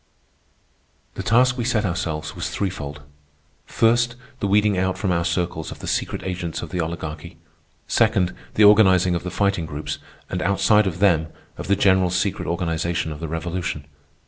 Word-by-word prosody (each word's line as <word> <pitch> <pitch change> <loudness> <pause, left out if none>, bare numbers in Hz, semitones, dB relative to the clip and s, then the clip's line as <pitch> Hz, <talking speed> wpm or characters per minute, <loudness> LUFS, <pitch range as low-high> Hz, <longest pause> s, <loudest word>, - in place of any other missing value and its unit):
The - - -5
task 125 +6 +3
we - - 0
set 115 -3 +1
ourselves 80 -4 -3
was - - -3
threefold. 75 -7 -4 0.6
First, 120 +1 +2 0.2
the 100 - -1
weeding 105 0 +3
out 95 0 0
from 95 - -1
our 85 -1 +1
circles 85 -2 -2
of - - -8
the - - -9
secret - - -2
agents 90 -3 -4
of 85 - -7
the 90 - -2
Oligarchy. 80 0 -6 0.5
Second, 110 -6 +2 0.2
the 105 - +5
organizing 95 -4 +6
of 85 - -1
the 90 - -5
Fighting 100 -4 0
Groups, 75 -1 -5 0.3
and 90 - -3
outside 100 +2 +3
of 90 -3 -3
them, 85 -6 +4 0.3
of - - -7
the 100 - +3
general 95 -2 +3
secret 90 +2 -1
organization 85 -1 -1
of 75 - -7
the 80 - -4
Revolution. 85 -1 -3
90 Hz, 170 wpm, -22 LUFS, 85-100 Hz, 0.6 s, organizing